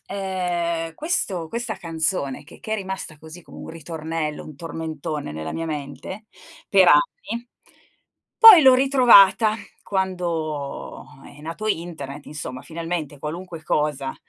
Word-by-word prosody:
ehm, 175 -4 -2
questo 195 - -2
questa 235 +3 -4
canzone 160 -5 -3
che 145 - -16
che 215 - -5
è - - +1
rimasta 190 -6 -6
così 160 +3 -12
come - - -14
un - - -9
ritornello, 160 -1 -5
un 155 - -10
tormentone 155 - -5
nella 80 +1 -5
mia 165 - -4
mente 155 +7 -6 0.4
per - - +5
anni - - +2 1.0
poi 425 -8 +12
l'ho 260 -2 +8
ritrovata 235 -5 +6 0.3
quando 170 -7 -3 0.2
è 145 +1 -14
nato 165 +7 -6
internet 160 -7 -4
insomma, 145 -3 -7
finalmente 165 -3 -5
qualunque 165 +2 -7
cosa, 145 -4 -1
165 Hz, 125 wpm, -23 LUFS, 150-195 Hz, 1.0 s, poi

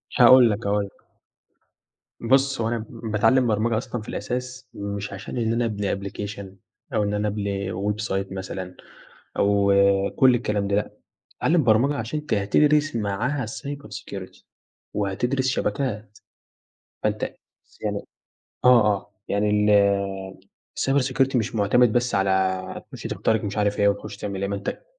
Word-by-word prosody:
هاقول 125 0 +8
لك، 105 +1 -2
هاقول 100 0 +1
لك. 100 - -18 1.1
بُص 135 +1 +2
هو 110 - 0
أنا 115 -1 -2
باتعلم 115 +2 +2
برمجة 110 +1 +1
أصلًا 120 0 -4
في 105 - -10
الأساس 125 +1 -4
مش 100 0 -5
عشان 100 +5 -7
إن 115 -1 +1
أنا 120 +1 +1
أبني 105 -3 -1
application 100 +1 -6 0.5
أو 105 - +2
إن 100 0 -1
أنا 105 0 0
أبني 100 -2 -2
website 100 0 -2
مثلًا 95 -1 -6 0.6
أو 100 0 +3 0.4
كل 130 -2 +6
الكلام 105 -4 -1
ده 100 - +1
لأ، 105 - -2 0.4
اتعلم 160 -1 +2
برمجة 120 +5 +3
عشان 115 +5 -3
أنت 150 - -2
هتدرس 150 +9 +2
معاها 115 +6 -1
cyber 140 +5 -7
security 95 -2 -8 0.5
وهتدرس 120 +7 0
شبكات، 110 -5 -2 0.8
فأنت - - -1 0.6
يعني - - -2 0.6
آه 125 -3 +7
آه 100 - -11 0.2
يعني 105 +1 +1
ال 100 -2 +2 0.4
الcyber 135 +1 +2
security 135 0 +1
مش 115 0 0
معتمد 110 +3 +3
بس 120 -1 +1
على 95 -1 0
تخش - - -9
تخترق 110 -1 0
مش 100 0 -4
عارف 105 -1 +1
إيه، 100 - +4
وتخش 100 0 -2
تعمل 100 -2 -4
إيه 100 - -1
ما 100 - -1
أنت 100 - -5
105 Hz, 145 wpm, -24 LUFS, 100-125 Hz, 1.1 s, هاقول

